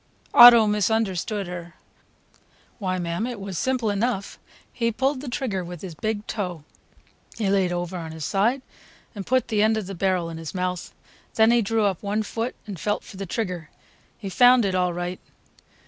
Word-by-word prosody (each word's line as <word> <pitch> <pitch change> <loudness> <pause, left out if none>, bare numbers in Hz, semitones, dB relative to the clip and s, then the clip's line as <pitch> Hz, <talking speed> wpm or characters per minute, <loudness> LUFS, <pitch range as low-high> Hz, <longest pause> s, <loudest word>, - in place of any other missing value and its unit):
Otto 240 -2 +10
misunderstood 210 -1 0
her. 175 -1 -8 1.0
"Why, 185 -3 -1
mam, 175 +5 -2
it 245 -4 -6
was 195 -1 -6
simple 255 -5 0
enough; 205 -1 -2 0.3
he 230 -1 0
pulled 265 +4 -1
the 280 - -6
trigger 240 -8 -2
with 175 0 -9
his 185 -3 -6
big 215 +5 -3
toe. 180 -7 -4 0.7
He 205 -4 0
layed 190 -3 +2
over 175 +1 -3
on 160 -1 -7
his 160 -2 -6
side 235 +7 +1 0.5
and 200 -4 -7
put 255 0 +1
the 210 -2 +1
end 220 +1 +3
of 215 - -3
the 195 - -6
barrel 180 -2 0
in 165 - -7
his 165 +2 -7
mouth, 180 -2 -3 0.4
then 220 +1 +5
he 240 0 +4
drew 220 +1 +1
up 195 -4 -1
one 210 +1 -1
foot 230 +3 -4
and 200 -5 -7
felt 205 +5 -1
for 195 - -12
the 195 0 -5
trigger. 180 -6 -4 0.5
He 205 - -7
found 245 +3 +5
it 190 - 0
all 180 -1 +1
right!" 175 +1 -4
200 Hz, 185 wpm, -24 LUFS, 180-225 Hz, 1.0 s, Otto